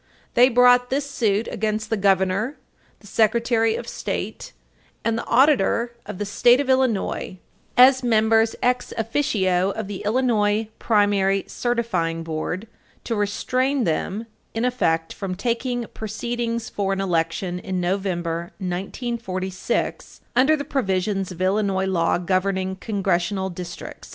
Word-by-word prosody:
They 250 +2 +6
brought 245 0 +5
this 280 +2 -1
suit 225 -5 0
against 215 0 -2
the - - +3
Governor, 195 +5 +1 0.4
the - - -18
Secretary 225 +1 +2
of - - -6
State, - - -4 0.5
and 230 -1 +2
the 230 - -4
Auditor 245 -3 +3
of - - -6
the 205 - -3
State 240 +5 +4
of 275 -2 +1
Illinois, 240 -7 0 0.4
as 260 +1 +7
members 225 -1 +3
ex 250 0 +1
officio 200 -6 +1
of 215 0 -4
the 200 -2 -5
Illinois 215 -2 +1
Primary 200 -3 +2
Certifying 185 -9 -1
Board, 165 +6 -4 0.4
to 230 - -2
restrain 255 +6 0
them, 195 +5 -1 0.3
in 225 +2 0
effect, 165 -10 0
from 190 -2 -4
taking 240 +3 -1
proceedings 235 +2 -3
for 195 -1 -1
an 195 - -3
election 175 0 -1
in 185 0 -3
November, 175 -2 -2
1946, 190 0 -3
under 270 +5 +5
the 285 -1 -5
provisions 195 -7 -1
of 180 +1 -4
Illinois 190 0 +1
law 175 -3 +1
governing 190 +1 0
Congressional 190 -2 -1
districts. 175 0 -8
210 Hz, 130 wpm, -23 LUFS, 190-240 Hz, 0.5 s, as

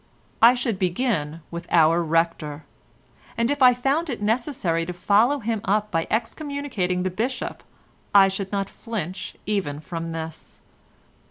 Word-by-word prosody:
I 235 +2 +8
should 235 -6 -2
begin 175 - -1
with 170 +1 -6
our 165 +1 +4
Rector, 165 -2 -1 0.7
and 230 +3 +1
if 285 -1 -2
I 250 -1 +7
found 280 +7 0
it 245 - -3
necessary 210 - 0
to 180 - -3
follow 210 +10 +3
him 225 -4 -2
up 210 0 0
by 165 -1 0
excommunicating 225 - -2
the 185 - -1
Bishop, 240 +7 -3 0.5
I 195 -1 +7
should 195 0 -4
not 200 -1 -1
flinch 195 -7 -6
even 190 -9 -1
from 165 +1 -5
this. 160 -1 -7
200 Hz, 145 wpm, -24 LUFS, 170-235 Hz, 0.7 s, I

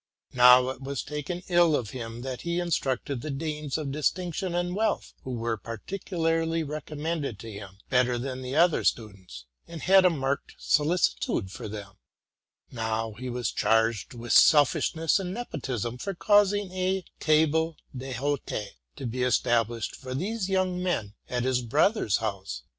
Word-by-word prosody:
Now 125 +1 +7
it 130 - -6
was 135 -1 -3
taken 150 +5 -5
ill 175 -3 +4
of 120 -6 -2
him 115 -1 -6
that 130 -2 -5
he 170 0 -1
instructed 140 -6 -1
the 155 - -5
Danes 150 0 -3
of 150 -3 -3
distinction 175 +4 -1
and 175 +1 -1
wealth, 215 0 -1
who - - -8
were 115 -2 -2
particularly 165 - -2
recommended 150 -3 -4
to 115 +3 -9
him, 100 -2 -9
better 125 -1 +3
than 130 +1 -4
the 130 +1 -4
other 170 +1 +4
students, 95 - -3 0.2
and 165 -2 -8
had 190 0 +6
a 180 - +6
marked 140 -4 -2
solicitude 150 - +1
for - - -7
them; 100 -2 -8 0.7
now 115 -1 -2
he 125 +4 -6
was 125 -1 -2
charged 115 0 +1
with 120 0 -2
selfishness 160 +3 +5
and 185 0 -4
nepotism 125 - -4
for 195 +5 -4
causing 205 0 +3
a 185 0 -1
table 160 +1 +2 0.2
d'hote 135 +2 -3 0.4
to - - -7
be 125 +2 -3
established 120 -2 +1
for 130 -1 -7
these 195 +5 -2
young 185 -1 0
men 135 - -1 0.2
at 125 -1 -1
his 130 -1 +1
brother's 145 - +2
house. 95 - -4
140 Hz, 155 wpm, -27 LUFS, 120-170 Hz, 0.7 s, Now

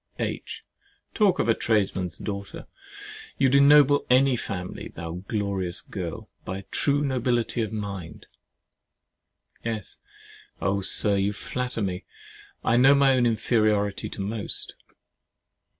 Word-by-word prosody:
H. - - -4 0.5
Talk 205 -4 +3
of - - 0
a 115 - +5
tradesman's 95 -8 0
daughter! 100 -1 -6 0.7
you 135 - +3
would - - -2
ennoble 145 0 +6
any 130 +1 +5
family, 90 -6 -5
thou 85 +2 -7
glorious 100 -5 0
girl, - - -6 0.2
by 95 +1 -6
true 145 0 +1
nobility 120 -3 0
of 110 - -2
mind. 100 -7 -6 1.4
S. 110 -4 -5 0.6
Oh! 100 +2 0
Sir, 100 +1 +2
you 100 +1 +1
flatter 125 +1 -3
me. 90 -2 -3 0.6
I 115 - +3
know 135 +3 +7
my 140 -1 +5
own 125 -2 +3
inferiority 110 -3 +1
to - - -7
most. 105 +2 -4
110 Hz, 120 wpm, -25 LUFS, 100-125 Hz, 1.4 s, know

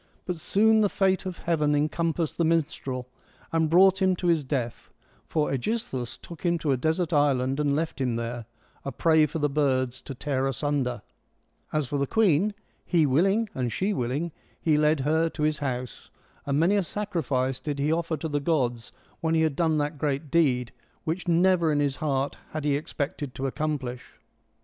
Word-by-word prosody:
But 180 -3 -3
soon 220 +6 +3
the 205 - +3
fate 190 -1 +1
of 185 - -5
heaven 150 -3 +1
encompassed 160 +2 -1
the - - +4
minstrel, 145 -6 -1 0.4
and 160 -1 +2
brought 190 +3 +5
him 190 -1 +3
to 180 - -6
his 165 -3 +3
death, 130 -4 -3 0.4
for 150 -2 0
^Egisthus 135 - -3
took 170 -3 -11
him 170 -1 +2
to 155 -3 -1
a - - +3
desert 160 +6 0
island 135 -2 +2
and 145 -1 +2
left 160 -2 -2
him 125 -3 0
there, 115 0 -4 0.4
a 140 - -4
prey 160 0 +3
for 150 - -4
the 145 -2 +1
birds 130 -3 0
to 135 - -8
tear 135 0 -1
asunder. 135 -4 -1 0.7
As 155 -2 0
for 140 +3 -2
the 140 - 0
queen 205 0 +2
— - - -39
he 165 -4 +3
willing 195 - +2
and 125 -2 -2
she 195 - 0
willing 145 +4 -2 0.2
— - - -35
he 155 -2 +2
led 150 -1 +3
her 160 +4 +2
to 155 - -4
his 155 0 +1
house. 125 -4 -4 0.4
And 140 +1 +1
many 180 +6 +3
a - - +3
sacrifice 150 -10 -2
did 145 +1 -4
he 145 +2 +1
offer 165 -1 0
to 155 - -4
the 145 -1 -1
gods 125 -6 -1 0.3
when 165 0 0
he 160 - +3
had 155 -3 +1
done 160 -1 +2
that 145 0 -2
great 145 0 -2
deed, 130 -8 +2 0.3
which 170 +3 -3
never 175 -1 +3
in 145 - +1
his 140 -2 0
heart 140 -2 -1 0.2
had 155 -1 -3
he 145 -1 +2
expected 145 -2 -4
to 135 - -3
accomplish. 135 -3 -3
150 Hz, 190 wpm, -26 LUFS, 135-165 Hz, 0.7 s, brought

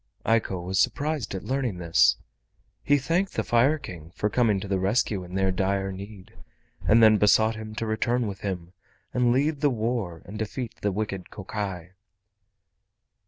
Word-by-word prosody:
Eiko 110 -5 +1
was 95 +1 0
surprised 145 -9 0
at 95 - -5
learning 130 -7 -1
this. 85 -1 +4 0.7
He 145 - +3
thanked 165 +8 0
the - - -1
Fire 125 +6 +3
King 85 - -9
for 105 - -1
coming 110 -5 +2
to 100 - -6
the 95 -1 0
rescue 100 0 +1
in 90 +1 -9
their 95 0 +2
dire 95 +1 0
need, 100 +2 -10 0.5
and 115 +1 +6
then 110 -1 +7
besought 110 +2 +4
him 110 -1 -8
to 115 - -2
return 120 +2 0
with 100 -2 -5
him 90 -3 -5 0.4
and 125 -1 +3
lead 145 +4 +1
the 145 - +4
war 110 -8 -2
and 105 +3 -8
defeat 115 +2 -4
the 105 - +1
wicked 95 -2 -4
Kokai. 95 -3 -5
105 Hz, 165 wpm, -26 LUFS, 95-120 Hz, 0.7 s, then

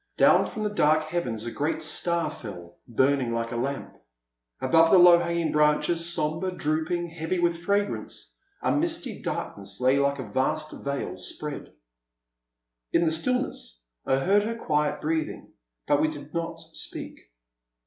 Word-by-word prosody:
Down - - +5
from 215 - -5
the 210 - -1
dark 155 -6 +3
heavens 140 -9 -3
a 120 - -3
great 145 +6 -1
star 170 -3 0
fell, 90 - -10
burning 130 0 +1
like 115 0 -2
a - - -3
lamp. 135 +3 -3 0.6
Above 165 +5 +4
the 190 - +7
low 175 -1 +8
hanging 170 -1 -1
branches, 150 +3 +2
sombre, 165 +3 -1
drooping, 170 +1 -1
heavy 165 +2 -2
with 170 -1 +1
fragrance, 200 +3 -2 0.3
a - - +2
misty 330 +2 -1
darkness - - -4
lay 130 +2 +3
like 140 0 +1
a 130 -5 -6
vast 155 +8 -1
veil 140 0 -4
spread. - - -5 1.2
In 170 - +3
the 160 - +2
stillness 160 - -2 0.2
I 135 - +2
heard 195 +9 +3
her 225 +2 -2
quiet 150 -9 0
breathing, 160 0 -3 0.3
but 145 0 +3
we 155 - +3
did 145 -1 -8
not 165 0 -3 0.2
speak. - - -5
155 Hz, 150 wpm, -26 LUFS, 140-170 Hz, 1.2 s, low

